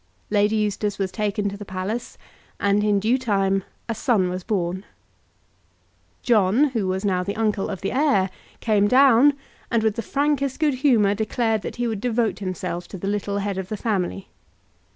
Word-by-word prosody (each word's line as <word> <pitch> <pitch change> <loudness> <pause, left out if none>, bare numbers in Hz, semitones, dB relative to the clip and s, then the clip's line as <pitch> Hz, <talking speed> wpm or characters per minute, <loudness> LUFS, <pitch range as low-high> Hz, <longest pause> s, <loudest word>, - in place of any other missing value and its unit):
Lady 210 +1 +3
Eustace 210 -1 -1
was 195 -2 -2
taken 205 +1 -1
to 200 - -3
the 205 - -8
palace, 200 +5 -4 0.4
and 200 +1 +2
in 205 -1 +2
due 230 +6 +1
time 195 -5 +1 0.2
a 230 - -1
son 215 -6 +1
was 185 0 -4
born. 185 -2 -2 1.4
John, 230 +5 +3
who 220 -6 -1
was 190 +2 -2
now 185 -2 +1
the 200 +2 -3
uncle 215 -3 0
of 190 - -5
the 195 - -2
heir, 260 -10 +2 0.3
came 210 -3 +3
down, 265 +3 +6 0.4
and, 230 -2 +1
with 220 -1 +2
the - - 0
frankest 280 +2 0
good 305 -3 +2
humour, 225 -8 +4
declared 220 +1 0
that - - -6
he 245 - -2
would 220 -4 -2
devote 235 -2 0
himself 180 -2 -4
to 195 - -8
the 195 - -5
little 200 0 -1
head 200 -1 -2
of 190 -1 -6
the 215 - -3
family. 195 -3 -2
205 Hz, 180 wpm, -23 LUFS, 195-230 Hz, 1.4 s, down